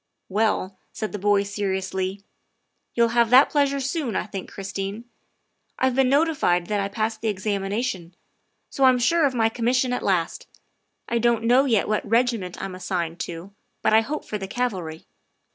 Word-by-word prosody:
" - - -54
Well," 195 -4 0
said 215 - -4
the 205 - -5
boy 205 0 +3
seriously, 190 -1 -3 0.4
" - - -50
you'll 235 0 +3
have 235 -1 +3
that 255 +3 +6
pleasure 280 -1 +2
soon, 275 -2 -2
I - - -1
think, 195 -3 -7
Christine. 195 +3 -5 0.7
I 260 0 +2
've - - -5
been 265 -1 +3
notified 275 - +2
that 210 -1 0
I 195 - 0
passed 215 +2 -3
the 225 - -2
examination, 200 -1 -2 0.6
so 275 - -1
I - - +8
'm 255 - +3
sure 290 +6 +3
of 260 - -4
my 225 -2 +3
commission 245 +2 0
at - - -2
last. 180 -4 -1 0.6
I 235 - 0
don't 235 -1 +2
know 250 +4 +4
yet 230 -6 +2
what 215 0 0
regiment 230 -5 0
I'm 195 -1 -5
assigned 180 -2 -3
to, 175 +4 -6 0.3
but - - +3
I 220 - +7
hope 295 +7 -4
for 210 - -4
the 195 - -5
cavalry. 190 -9 -3
215 Hz, 185 wpm, -24 LUFS, 195-250 Hz, 0.7 s, I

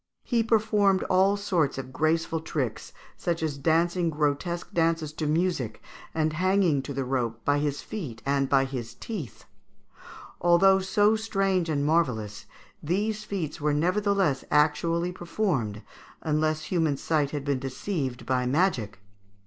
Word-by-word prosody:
He 235 -2 +1
performed 210 -4 +2
all 190 +2 +4
sorts 175 -9 0
of 130 -1 -6
graceful 160 +2 +1
tricks, 135 -8 -3 0.3
such 170 -2 -2
as 155 -3 -1
dancing 170 +3 +2
grotesque 155 +3 -2
dances 165 -2 +1
to 155 -1 -3
music 155 -8 0 0.4
and 155 -1 +1
hanging 185 -3 +2
to 140 +1 -6
the 135 -1 -1
rope 120 -3 -2
by 145 0 +3
his 145 -1 -2
feet 150 - -6
and 135 -1 +1
by 135 -1 +4
his 120 -3 -6
teeth. 180 - -7 1.0
Although 190 +3 +5
so 205 +3 +3
strange 195 -5 0
and 145 -2 0
marvellous, 125 -11 0 0.3
these 210 +7 -1
feats 170 -9 -4
were 150 0 +1
nevertheless 185 -3 +1
actually 165 +3 +2
performed, 165 - -2 0.4
unless 155 0 0
human 160 -4 0
sight 150 -2 0
had 145 -1 -5
been 140 -2 0
deceived 135 0 -4
by 125 -1 0
magic. 125 - 0
160 Hz, 140 wpm, -27 LUFS, 140-185 Hz, 1.0 s, Although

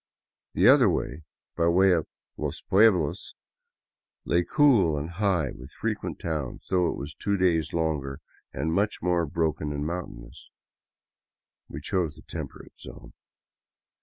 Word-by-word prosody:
The - - +4
other, - - +7 0.7
by 85 0 +2
way 95 +3 +5
of 85 -3 +1 0.2
" - - -66
los 75 +1 -4
pueblos," 95 -6 +2 0.9
lay 85 - +2
cool 110 - +4
and 75 +4 -4
high, 85 -6 0
with 65 +2 -12
frequent - - -3
towns, 75 -6 -4
though 90 -2 +3
it - - -3
was 75 +2 -6
two 100 +5 -1
days 85 -4 +1
longer 75 -5 -2 0.3
and 80 +5 -2
much 105 +4 0
more 85 -2 +1
broken 80 -1 -1
and 75 0 -3
mountainous. 75 -8 -7 1.2
We 70 - -7
chose 85 -1 -1
the - - -16
temperate - - -9
zone. - - -12
85 Hz, 135 wpm, -26 LUFS, 75-90 Hz, 1.2 s, other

